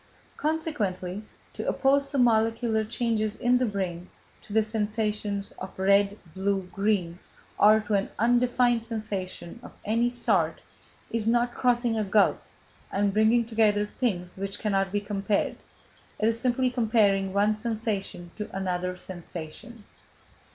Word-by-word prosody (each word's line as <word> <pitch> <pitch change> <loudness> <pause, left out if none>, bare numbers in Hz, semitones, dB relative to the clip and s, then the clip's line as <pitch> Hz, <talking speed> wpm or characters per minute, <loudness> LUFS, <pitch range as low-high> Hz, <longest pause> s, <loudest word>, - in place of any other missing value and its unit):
Consequently, 210 - -2 0.3
to - - -3
oppose 275 0 +2
the 280 - -3
molecular 225 -2 +2
changes 220 -1 -1
in 250 0 +2
the 250 - +1
brain 185 -4 -3 0.3
to 240 - -15
the 220 +1 +3
sensation 210 -1 -2 0.2
of 190 - -8
red, 200 +1 +3 0.2
blue, 195 +1 0
green, 195 -4 0 0.4
or 215 +1 +7
to 210 0 -4
an 200 -1 +1
undefined 240 0 +3
sensation 210 -4 -5
of - - -12
any 230 +3 +2
sort, 245 0 +1 0.5
is 225 -1 -1
not 240 +1 +2
crossing 240 -2 +1
a - - +1
gulf, 205 0 +2 0.4
and 200 0 +1
bringing 220 +3 +4
together 215 -2 +2
things 190 -6 -3
which 195 +1 -4
cannot 195 -3 0
be 205 - +1
compared, 205 0 -1 0.6
it 215 - +1
is 230 0 +1
simply 255 0 +1
comparing 215 -5 +2
one 205 +2 +3
sensation 215 -5 -3
to 210 - -5
another 180 -1 -2
sensation. 180 +5 -9
215 Hz, 135 wpm, -27 LUFS, 195-235 Hz, 0.6 s, or